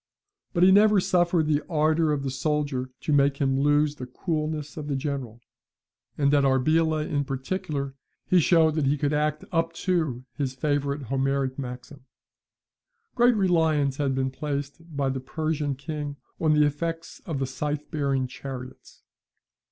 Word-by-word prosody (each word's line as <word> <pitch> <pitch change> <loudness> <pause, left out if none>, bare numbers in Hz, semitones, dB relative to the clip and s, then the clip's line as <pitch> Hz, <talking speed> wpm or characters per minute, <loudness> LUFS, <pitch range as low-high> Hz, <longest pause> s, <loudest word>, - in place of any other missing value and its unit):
But 175 -2 +3
he 190 - +7
never 210 +1 +6
suffered 175 -3 +2
the 150 -1 +1
ardour 155 0 +2
of 145 -2 -1
the 135 - -2
soldier 140 -1 -1
to 150 - -1
make 140 -1 +3
him 135 -2 +1
lose 145 +1 +3
the 125 - -6
coolness 155 +1 -3
of 150 -2 -6
the 140 - -1
general; 135 -4 -4 0.8
and 140 -1 +2
at 145 -1 +4
Arbela, 155 +4 +2
in 145 -1 0
particular, 140 0 -3 0.3
he 180 - +4
showed 160 -1 +4
that 150 -3 0
he 145 +2 +2
could 145 +1 0
act 150 0 0
up 165 -1 0
to 155 -9 -1
his 135 -2 -2
favourite 145 0 -1
Homeric 135 +1 -1
maxim. 130 +1 -8 1.1
Great 245 0 +4
reliance 160 -8 +2
had 140 -2 0
been 130 0 0
placed 145 +2 -4 0.2
by 140 -1 +1
the 135 0 -2
Persian 150 +1 -2
king 145 +1 -5 0.2
on 155 -1 +3
the 150 0 +5
effects 165 +3 -3
of 160 -5 -2
the 135 - 0
scythe 145 +3 -4
bearing 140 -4 0
chariots. 130 0 -9
145 Hz, 160 wpm, -26 LUFS, 135-155 Hz, 1.1 s, he